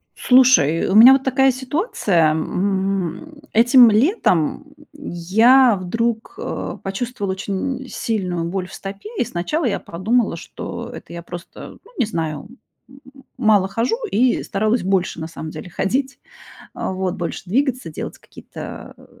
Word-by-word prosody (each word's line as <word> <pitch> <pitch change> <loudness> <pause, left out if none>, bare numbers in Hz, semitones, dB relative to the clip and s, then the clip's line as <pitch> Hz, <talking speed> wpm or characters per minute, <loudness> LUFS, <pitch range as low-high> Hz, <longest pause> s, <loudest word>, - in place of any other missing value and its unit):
Слушай, 250 - +4
э, - - -2
у - - +1
меня 240 +5 +10
вот 270 0 +2
такая 265 0 +3
ситуация, 255 - 0
м. 190 - -2 0.2
Этим 240 +1 +7
летом 220 - +1 0.3
я 235 - +3
вдруг, 230 +5 -2
э, - - -5
почувствовала 200 0 -3
очень 245 +8 -4
сильную 180 -7 -2
боль 180 +1 -3
в - - -14
стопе. 195 - -8
И - - +2
сначала 270 - -2
я 225 - 0
подумала, 210 +5 -1
что 165 - -7
это - - -10
я 170 0 -7
просто, 175 +1 -10
ну, 460 - -20
не 250 - +2
знаю, 160 -5 -4 0.4
м, 270 +1 -16 0.4
мало 205 -3 +3
хожу, 230 - -1
и 245 +3 +2
старалась 215 +3 0
больше, 190 -2 0
на 160 - -4
самом 160 -1 -8
деле, 155 +4 -9
ходить, 260 - -2 0.6
вот 185 -1 -3
больше 175 -4 -5
двигаться, 255 - 0
делать 155 - -7
какие-то, - - -10
э, - - -18
205 Hz, 145 wpm, -20 LUFS, 180-255 Hz, 0.6 s, меня